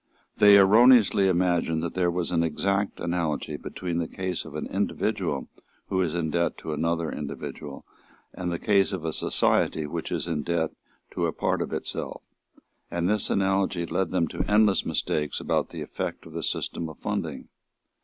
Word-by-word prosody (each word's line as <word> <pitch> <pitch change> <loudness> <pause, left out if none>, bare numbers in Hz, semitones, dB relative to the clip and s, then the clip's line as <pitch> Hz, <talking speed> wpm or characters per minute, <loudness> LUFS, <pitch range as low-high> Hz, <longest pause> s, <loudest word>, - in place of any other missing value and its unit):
They 100 -1 +8
erroneously 105 0 +6
imagined 85 -3 +1
that 85 - -3
there 90 -1 +1
was 85 0 -1
an 85 -2 +2
exact 100 +5 0
analogy 85 -3 -2
between 85 +3 -4
the 85 - -1
case 95 -1 -3
of 80 -2 -10
an 75 - -3
individual 95 -5 -1 0.4
who 95 - +1
is 85 -3 -1
in 80 -2 -1
debt 85 +1 0
to 80 - -5
another 85 +1 -1
individual 75 -2 -7 0.5
and 90 -1 -3
the 85 - -1
case 100 -1 +2
of 90 -4 -4
a 80 - -1
society 80 - +2
which 75 - -5
is - - -1
in 80 -3 -2
debt 80 0 -1 0.4
to - - 0
a - - -1
part - - -1
of - - -3
itself; - - -4 0.7
and 85 0 -1
this 105 +1 +2
analogy 95 -2 +1
led 95 +1 -1
them 90 -2 +1
into 80 - -2
endless 105 -1 +4
mistakes 75 -1 -1
about - - 0
the - - -6
effect - - -5
of - - -12
the - - -3
system 80 -1 -2
of 80 - -11
funding. - - -4
85 Hz, 175 wpm, -26 LUFS, 80-95 Hz, 0.7 s, They